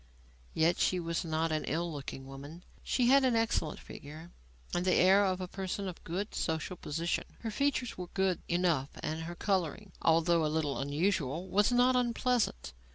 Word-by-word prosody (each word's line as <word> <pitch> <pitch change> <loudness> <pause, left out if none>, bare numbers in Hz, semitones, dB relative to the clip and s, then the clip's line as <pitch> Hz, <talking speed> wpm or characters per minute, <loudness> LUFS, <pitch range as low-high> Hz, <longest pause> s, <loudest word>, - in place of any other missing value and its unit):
Yet 165 +2 +3
she 185 - +2
was 170 -1 -2
not 160 0 -1
an 155 -1 0
ill 170 +1 -2
looking 135 -2 -6
woman. 140 +6 -10 0.2
She 245 -2 +1
had 275 +1 +6
an 255 -3 +3
excellent 225 -9 0
figure, 155 +4 -10 0.4
and 175 - +1
the 185 -1 +3
air 190 +3 +6
of 185 -2 0
a 185 - -4
person 195 +1 -4
of 180 - -7
good 190 +6 -4
social 160 +2 -2
position; 165 +1 -2 0.2
her 225 - -3
features 265 -3 -1
were 180 - -4
good 190 0 0
enough 170 -6 +1
and 160 +1 -2
her 175 +1 -6
colouring, 190 +1 -1
although 165 0 +3
a - - +2
little 150 -2 -1
unusual, 155 +2 0
was 205 +5 +3
not 250 +1 +4
unpleasant. 240 - 0
175 Hz, 175 wpm, -32 LUFS, 160-200 Hz, 0.4 s, had